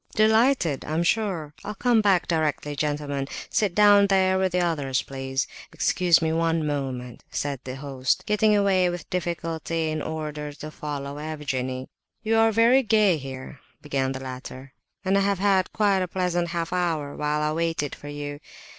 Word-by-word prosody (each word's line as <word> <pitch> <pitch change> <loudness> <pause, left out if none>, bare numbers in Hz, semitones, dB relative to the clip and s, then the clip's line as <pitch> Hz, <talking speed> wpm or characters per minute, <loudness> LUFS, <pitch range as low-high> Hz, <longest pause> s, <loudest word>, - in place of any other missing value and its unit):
"Delighted, 220 - +3
I'm 160 +2 -1
sure!—I'll 190 -1 -2
come 235 +1 +3
back 195 -4 +3
directly, 150 -3 -1
gentlemen,—sit 145 +6 -2
down 205 -1 +6
there 190 -1 +3
with 190 -1 +1
the 180 - +1
others, 145 -7 0
please,—excuse 145 +5 0
me 160 0 +1
one 165 -1 +1
moment," 130 -4 -4
said 140 -2 -3
the 130 0 -5
host, 135 -2 -1
getting 210 0 +3
away 190 -3 +3
with 175 -2 -6
difficulty 165 -2 -2
in 155 0 -2
order 150 -2 -4
to 155 +1 -8
follow 145 -1 -5
Evgenie. 130 -4 -3 0.4
"You 225 0 +2
are 225 0 +5
very 230 +4 +5
gay 215 -7 +3
here," 135 -1 -8 0.2
began 135 -2 -1
the 130 - -5
latter, 130 0 -8 0.3
"and 195 +1 +3
I - - +2
have 200 0 +1
had 190 -1 +2
quite 200 -3 +2
a 185 - -1
pleasant 175 -1 -1
half 170 0 -3
hour 165 -5 -1
while 150 0 -1
I 150 0 0
waited 165 -3 -1
for 145 - -10
you. 145 0 -6
160 Hz, 160 wpm, -25 LUFS, 145-190 Hz, 0.4 s, down